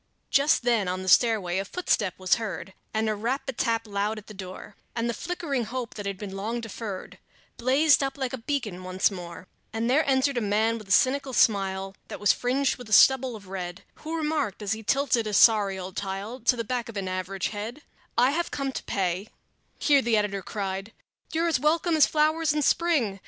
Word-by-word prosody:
Just 280 -2 +4
then 230 -5 +2
on 185 +1 -2
the - - -7
stairway 190 -4 +3
a - - -1
footstep 210 - 0
was 185 -1 +2
heard 200 -3 -5 0.2
And 220 0 0
a 215 - +1
rap 235 +8 -2
a 270 - -2
tap 230 -1 0
loud 205 +1 -2
at 215 - -9
the 215 - -11
door, 190 +1 -9 0.2
And 230 0 -1
the 235 - -1
flickering 285 -4 -3
hope 245 +1 -5
that 205 -1 -6
had 200 -1 -3
been 195 -1 -7
long 220 +5 -3
deferred 220 -3 -7 0.4
Blazed 280 +6 +4
up 275 +1 -2
like 265 -2 -3
a 260 - -4
beacon 225 -8 -3
once 185 +2 +1
more; 180 -1 -8 0.2
And 225 +2 -1
there 300 +4 +4
entered 265 0 +2
a - - +1
man 220 +2 +1
with 215 - -12
a - - -8
cynical 270 0 0
smile 195 -3 +2
That - - -7
was 205 - +4
fringed 260 +2 0
with 245 -3 -11
a - - -1
stubble 260 +1 +6
of 200 -3 -12
red, 180 0 -6
Who 320 +2 -5
remarked, 300 -10 -1
as 200 - -2
he 220 0 -1
tilted 240 -1 +1
a 210 - -1
sorry 205 -3 +5
old 185 0 -7
tile 200 +5 -4
To 240 +1 +3
the 230 - -3
back 240 0 -3
of 220 - -7
an 195 -1 -3
average 185 +1 -2
head: 220 +7 -6 0.3
"I 250 +3 +5
have 340 +3 -1
come 275 -1 -2
here - - -6
to - - -5
pay" 190 +1 -1 0.5
Here 285 -2 +4
the 235 -3 +2
editor 205 -2 -1
cried 195 +2 -4 0.4
"You're 330 +1 +1
as 325 -6 +2
welcome 325 +4 +2
as 305 - +6
flowers 310 0 +2
in 300 -1 0
spring! 275 - +2
225 Hz, 215 wpm, -26 LUFS, 195-265 Hz, 0.5 s, stubble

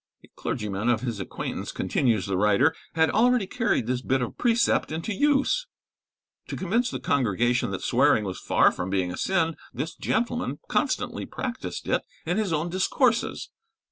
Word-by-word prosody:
A - - -17
clergyman 105 0 -2
of 120 -2 +2
his 120 -5 -3
acquaintance, 95 - -5
continues 115 -7 0
the 100 - -1
writer, 105 +10 +3 0.2
had 160 0 +3
already 245 -1 +3
carried 225 - 0
this 125 +1 -1
bit 130 +1 +1
of 125 - -3
precept 235 -7 +2
into 165 +7 -3
use. 290 - +2 0.8
To - - -5
convince 230 +7 0
the - - -4
congregation 120 -1 +1
that - - -4
swearing 110 - +3
was 95 -2 -5
far - - +4
from 90 - -4
being 95 -2 0
a - - -5
sin, 165 -4 +1 0.2
this 160 - -3
gentleman 240 +2 -1
constantly - - -1
practised 255 -1 -5
it - - +2 0.2
in 175 +4 0
his 215 -5 0
own 160 +1 0
discourses. 225 +6 +1
160 Hz, 165 wpm, -26 LUFS, -, 0.8 s, far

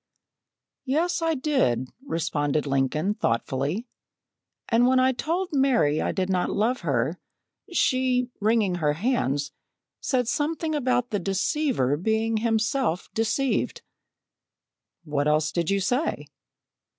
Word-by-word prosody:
"Yes, 330 +6 +1
I 325 -1 +1
did," 255 - +1 0.2
responded 150 - -1
Lincoln 140 +7 0
thoughtfully, 140 - -1 0.8
"and 235 +1 +4
when 260 0 +4
I 260 +1 +4
told 335 +8 -2
Mary 245 - +3
I - - 0
did 185 -2 -1
not 185 -2 0
love 235 +5 0
her, 145 +1 -1 0.5
she, 255 -5 +1
wringing 210 -4 +2
her 150 -1 +2
hands, 150 - 0 0.5
said 250 -4 0
something 315 +4 -1
about 250 -4 0
the 205 - 0
deceiver 195 - 0
being 220 +5 0
himself 225 - 0
deceived." 235 +4 0 1.2
"What 150 -2 -1
else 155 +1 +2
did 170 -2 -1
you 200 0 +2
say?" 245 - -1
220 Hz, 115 wpm, -25 LUFS, -, 1.2 s, and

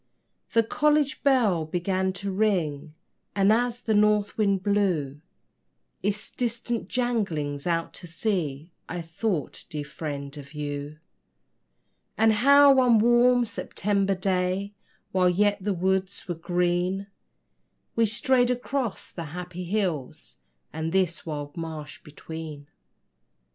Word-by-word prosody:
The 230 -1 +5
college 295 +2 +1
bell 235 - +3
began 185 +4 -1
to 195 +1 -4
ring, 170 -8 0 0.4
And 200 +1 +5
as 245 +1 0
the 220 - +1
north 210 0 +3
wind 200 -3 +1
blew 180 -9 0 0.8
Its 205 +1 -1
distant 235 -1 -2
janglings 180 - -1
out 165 -1 0
to 175 - -9
sea, 165 -4 -2 0.2
I 175 0 -4
thought, 165 - -3
dear 150 -4 -4
Friend, 140 -2 -6
of 140 +1 -11
you; 145 0 -4 1.2
And 220 0 +5
how 280 +5 +7
one 250 -3 +5
warm 240 +2 +5
September 200 -3 -1
day, 185 +1 0 0.4
While 185 -1 +3
yet 205 +2 +2
the 205 - 0
woods 190 +2 -1
were 175 - -1
green, 175 +3 0 0.9
We 230 -1 +3
strayed 245 +3 +2
across 250 -1 -2
the 170 - -6
happy 180 0 -6
hills 175 -8 -2 0.3
And 160 +1 -3
this 180 -3 0
wide 145 -2 -5
marsh 160 -4 -6
between. 155 -1 -8
190 Hz, 120 wpm, -26 LUFS, 165-220 Hz, 1.2 s, how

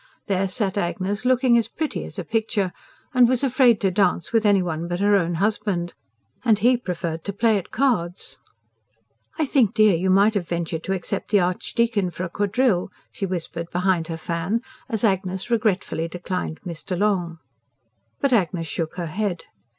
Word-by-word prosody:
There 195 -1 0
sat 200 0 0
Agnes, 200 +4 -2
looking 255 -1 +4
as 230 - -1
pretty 315 -1 -3
as - - -9
a 185 - -3
picture, 215 -2 -1 0.4
and 250 -2 +6
was 255 +1 +1
afraid 255 -4 +4
to 195 -2 +2
dance 180 -1 +1
with 225 -2 +3
any 200 -2 +4
one 170 -1 -3
but 175 0 -3
her 205 +1 +4
own 175 -3 +1
husband. 195 -2 -1 0.5
And 225 -4 +4
he 245 +4 +4
preferred 170 -7 -4
to 200 - -3
play 215 +1 +3
at 185 - -11
cards! 215 -10 -1 1.0
"I 315 - +1
think, 255 -8 +2
dear, 215 -4 +5
you 185 +3 0
might 200 +3 +5
have 190 -5 -2
ventured 170 -2 -3
to 190 - 0
accept 190 +1 -4
the 205 - +4
Archdeacon 200 +3 0
for 175 +1 -6
a 185 - -3
quadrille," 205 0 +1 0.2
she 195 - -3
whispered 170 -2 -4
behind 180 -2 +1
her 165 - -4
fan, 170 +7 -2 0.3
as 220 -3 -2
Agnes 190 0 0
regretfully 200 -7 0
declined 180 -1 -4
Mr. 175 +1 -4
Long. 180 -4 0 0.8
But 275 -2 +2
Agnes 175 -6 +1
shook 160 +2 -4
her 175 -1 -3
head. 180 +1 -2
195 Hz, 175 wpm, -23 LUFS, 175-220 Hz, 1.0 s, and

